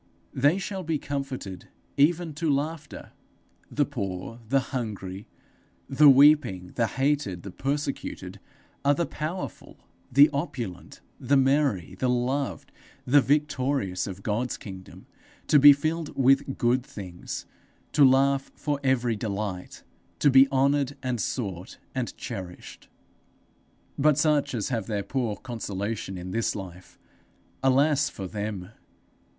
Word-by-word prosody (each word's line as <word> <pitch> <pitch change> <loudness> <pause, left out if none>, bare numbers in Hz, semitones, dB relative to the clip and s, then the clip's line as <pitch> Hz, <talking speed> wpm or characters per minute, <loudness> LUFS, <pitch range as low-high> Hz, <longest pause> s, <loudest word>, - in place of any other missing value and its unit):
They 145 +7 +3
shall 195 0 -4
be 160 -2 -1
comforted 135 -10 -5 0.3
even 160 +3 +2
to 160 +2 -2
laughter! 145 +1 -4 0.6
The 145 - +1
poor, 110 -3 -5
the 135 +1 +4
hungry, 105 -5 -5 0.6
the 145 +2 +6
weeping, 135 -10 +5
the 115 -2 +1
hated, 135 -11 -1
the 100 - -7
persecuted, 135 -8 -4 0.4
are 145 +1 +4
the 170 - 0
powerful, 155 +6 -6 0.3
the 140 +4 +8
opulent, 135 - -5 0.2
the 140 +2 +2
merry, 135 - +2
the 130 - +1
loved, 125 - -1 0.3
the 145 +3 +5
victorious 135 - 0
of 95 0 -8
God's 115 +4 -1
kingdom, 95 -2 -11 0.4
to 150 - +5
be 145 +1 +10
filled 155 +3 -1
with 135 0 +3
good 120 +1 +2
things, 90 -7 -7 0.5
to 145 - +4
laugh 135 +1 +4
for 145 -2 -2
very 125 -3 +1
delight, 100 -3 -5 0.3
to 145 - +4
be 135 +1 +7
honoured 140 +1 +1
and 125 -3 -1
sought 95 -8 -4 0.2
and 130 -3 -3
cherished! 95 -6 -8 1.1
But 150 0 +4
such 150 -4 +2
as 105 -4 -2
have 115 -6 -2
their 105 -3 -2
poor 120 -4 -2
consolation 105 -4 -5
in 90 +1 -7
this 115 +3 0
life 95 -3 -9 0.6
alas 140 +2 +3
for 95 - -7
them! 100 -1 -5
130 Hz, 125 wpm, -26 LUFS, 100-145 Hz, 1.1 s, be